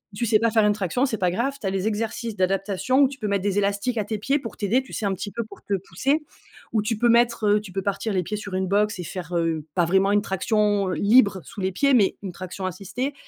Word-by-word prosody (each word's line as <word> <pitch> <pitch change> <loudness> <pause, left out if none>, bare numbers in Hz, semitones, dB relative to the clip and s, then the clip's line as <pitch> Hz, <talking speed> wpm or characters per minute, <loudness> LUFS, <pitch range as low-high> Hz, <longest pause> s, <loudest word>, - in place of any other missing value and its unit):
tu 235 - -1
sais 220 -1 +4
pas 230 +1 +2
faire 220 -1 +4
une 210 - +4
traction, 210 +6 0
c'est 235 -5 -2
pas 180 - +2
grave: 240 +9 -1
tu 205 - -2
as - - +2
les 195 +1 -1
exercices 225 +1 -3
d'adaptation 195 +7 +1
où 275 - +6
tu 270 -1 -10
peux 215 - -2
mettre 200 -2 0
des 205 0 +1
élastiques 200 +5 -1
à - - +1
tes 215 +1 -3
pieds 275 +8 +1
pour 230 -5 -8
t'aider, 225 +5 +1
tu 265 - -14
sais 215 - -3
un 195 - +1
petit 190 +2 -5
peu 235 +2 -3
pour 205 -2 -14
te 200 - -1
pousser, 290 +3 0 0.5
ou 220 - +2
tu 215 +1 -1
peux 240 +2 +3
mettre, 235 -1 +3
heu 205 0 +4
tu 210 -3 -11
peux 195 +1 -3
partir 200 +2 -2
les 185 -1 +1
pieds 210 - -4
sur 205 -2 -6
une 190 0 0
box 210 +2 +1
et - - -3
faire, 175 0 -6
heu, 165 -2 0
pas 175 -2 +3
vraiment 190 +3 +3
une 205 0 +3
traction 205 0 +1
libre 200 +1 +4
sous 200 - -8
les 190 0 0
pieds, 280 +9 +2
mais 210 -6 +3
une 190 - -4
traction 185 +1 -6
assistée. 210 - -4
205 Hz, 275 wpm, -24 LUFS, 190-230 Hz, 0.5 s, où